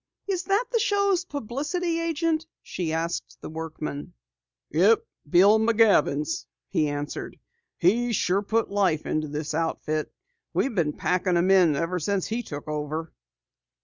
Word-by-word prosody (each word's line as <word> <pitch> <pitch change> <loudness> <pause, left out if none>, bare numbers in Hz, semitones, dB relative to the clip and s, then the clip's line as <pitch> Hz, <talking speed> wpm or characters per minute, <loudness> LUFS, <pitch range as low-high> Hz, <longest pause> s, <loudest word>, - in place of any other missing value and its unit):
"Is 380 -2 -2
that 400 +4 +2
the 465 - +2
show's 400 -3 +2
publicity 300 - -2
agent?" 330 -1 0 0.2
she 170 -3 -3
asked 165 +2 -3
the - - -7
workman. 155 -2 -5 0.6
"Yep, 195 +9 +4 0.2
Bill 200 +7 +6
McJavins," 210 -10 +3 0.2
he 155 - +1
answered. 145 0 -5 0.4
"He's 230 +6 +2
sure 190 +1 +1
put 225 +2 0
new 200 - -7
life 180 -6 +2
into 155 0 -1
this 150 +1 -4
outfit. 155 -1 -1 0.4
We've 270 - +1
been 160 -7 +1
packin' 180 0 0
them 175 +2 +3
in 180 -6 +5
ever 165 +5 -1
since 195 +3 0
he 230 +2 -2
took 145 -10 -8
over." 155 +2 -4
185 Hz, 145 wpm, -26 LUFS, 155-245 Hz, 0.6 s, Bill